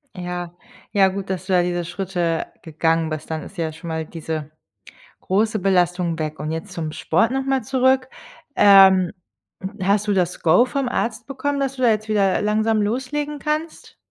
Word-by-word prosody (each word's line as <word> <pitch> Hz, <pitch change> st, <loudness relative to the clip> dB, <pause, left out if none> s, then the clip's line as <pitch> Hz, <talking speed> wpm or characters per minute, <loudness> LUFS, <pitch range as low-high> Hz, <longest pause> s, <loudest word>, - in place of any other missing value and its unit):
Ja. 175 Hz, -1 st, -5 dB, 0.4 s
Ja, 195 Hz, -2 st, +5 dB
gut, 195 Hz, 0 st, -4 dB
dass 185 Hz, -1 st, -3 dB
du 190 Hz, -, -1 dB
da 180 Hz, -, +5 dB
diese 175 Hz, -1 st, -2 dB
Schritte 175 Hz, -3 st, -2 dB, 0.2 s
gegangen 160 Hz, 0 st, 0 dB
bist, 155 Hz, +1 st, -6 dB
dann 160 Hz, -1 st, -3 dB
ist 195 Hz, -, -12 dB
ja 160 Hz, -2 st, -2 dB
schon 165 Hz, +2 st, -11 dB
mal 160 Hz, -1 st, -3 dB
diese 155 Hz, -2 st, -6 dB, 0.7 s
große 215 Hz, +2 st, 0 dB
Belastung 180 Hz, -3 st, +1 dB
weg. 155 Hz, -1 st, -4 dB
Und 155 Hz, +1 st, -3 dB
jetzt 165 Hz, +5 st, -5 dB
zum 160 Hz, -3 st, -4 dB
Sport 225 Hz, +2 st, +1 dB
nochmal 270 Hz, -1 st, 0 dB
zurück, 260 Hz, +1 st, +2 dB, 0.5 s
ähm, 190 Hz, -3 st, +7 dB, 0.7 s
hast 200 Hz, +2 st, +1 dB
du 205 Hz, -, +2 dB
das 180 Hz, -2 st, -1 dB
Go 175 Hz, +10 st, +5 dB
vom 275 Hz, 0 st, -2 dB
Arzt 235 Hz, -1 st, -2 dB
bekommen, 280 Hz, +1 st, -2 dB
dass 270 Hz, -1 st, -1 dB
du 255 Hz, -, -7 dB
da 240 Hz, -, +5 dB
jetzt 215 Hz, 0 st, 0 dB
wieder 200 Hz, -3 st, +2 dB
langsam 215 Hz, +1 st, +1 dB
loslegen 285 Hz, +7 st, -2 dB
kannst? 305 Hz, +2 st, -4 dB
195 Hz, 175 wpm, -21 LUFS, 170-235 Hz, 0.7 s, ähm